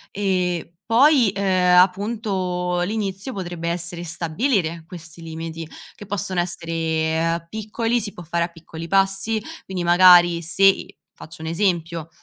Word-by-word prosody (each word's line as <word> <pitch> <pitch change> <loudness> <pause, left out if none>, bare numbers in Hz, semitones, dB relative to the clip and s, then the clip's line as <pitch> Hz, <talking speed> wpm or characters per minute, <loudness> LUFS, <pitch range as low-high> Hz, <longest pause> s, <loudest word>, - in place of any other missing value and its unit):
E 180 -4 -1
poi 255 0 +5
ehm, 185 -2 +3
appunto 185 -2 0
l'inizio 195 +3 -3
potrebbe 175 -5 -4
essere 170 0 -3
stabilire 170 - -1
questi 170 -2 -11
limiti, 165 0 -7 0.3
che 205 - -12
possono 190 -2 -2
essere 165 -1 -1
piccoli, 225 +4 -2
si 205 - -5
può 175 - -10
fare 170 +1 -1
a - - -6
piccoli 165 -1 -10
passi, 195 +4 +1 0.3
quindi 185 -2 -4
magari 175 -1 +6
se 180 +4 +3
ehm, 195 - +3 0.3
faccio 160 0 -12
un - - -5
esempio, 165 -2 -1
180 Hz, 130 wpm, -22 LUFS, 165-195 Hz, 0.3 s, magari